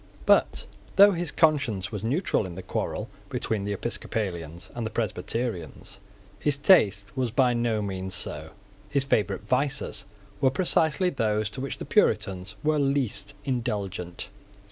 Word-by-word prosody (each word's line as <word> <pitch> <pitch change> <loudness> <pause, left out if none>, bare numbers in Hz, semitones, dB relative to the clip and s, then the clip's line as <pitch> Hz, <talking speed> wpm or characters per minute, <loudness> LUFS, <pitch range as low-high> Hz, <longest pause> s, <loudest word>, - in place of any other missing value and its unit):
But, - - +3 0.3
though 200 +1 +9
his 175 -4 -2
conscience 130 - +2
was 105 -2 -5
neutral 130 - 0
in 85 - -8
the 95 - -7
quarrel - - -3 0.2
between 105 -3 -2
the 105 - -2
Episcopalians 95 -6 -4
and 120 - -4
the 110 - -2
Presbyterians, 110 - -3 0.4
his 145 -2 +1
taste 105 - +4
was 130 -2 0
by 125 +1 +3
no 120 -3 0
means 95 -1 -3
so. - - -2 0.4
His 140 -1 +2
favourite 100 -7 +1
vices 135 -2 -1 0.4
were 130 - +5
precisely 160 +3 +2
those 110 -5 0
to 130 - -5
which 135 -2 -4
the - - -6
Puritans 95 +2 +1
were 155 0 +2
least 140 -4 0
indulgent. 100 -9 -3
115 Hz, 145 wpm, -27 LUFS, 100-140 Hz, 0.4 s, though